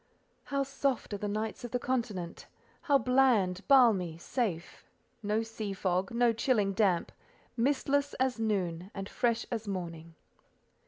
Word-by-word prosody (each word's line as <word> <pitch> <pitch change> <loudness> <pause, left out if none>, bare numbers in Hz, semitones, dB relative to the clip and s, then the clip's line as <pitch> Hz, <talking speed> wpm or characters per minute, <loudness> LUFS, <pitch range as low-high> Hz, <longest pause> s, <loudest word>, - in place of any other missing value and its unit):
How 275 0 0
soft 275 -4 -2
are 205 - -3
the 210 - -2
nights 215 +2 -3
of 240 - -5
the 250 - 0
Continent! 230 -9 -3 0.3
How 285 -4 +4
bland, 240 -8 +3
balmy, 215 - +5
safe! 175 -3 -3 0.4
No 215 +1 0
sea 220 -2 -5
fog; 185 0 0
no 235 0 +2
chilling 220 -4 +1
damp: 190 -4 +1 0.4
mistless 280 +3 +1
as 255 -2 0
noon, 185 -5 -1
and 195 -1 -5
fresh 235 +1 0
as 225 -2 -3
morning. 170 -4 -5
220 Hz, 140 wpm, -31 LUFS, 190-250 Hz, 0.4 s, balmy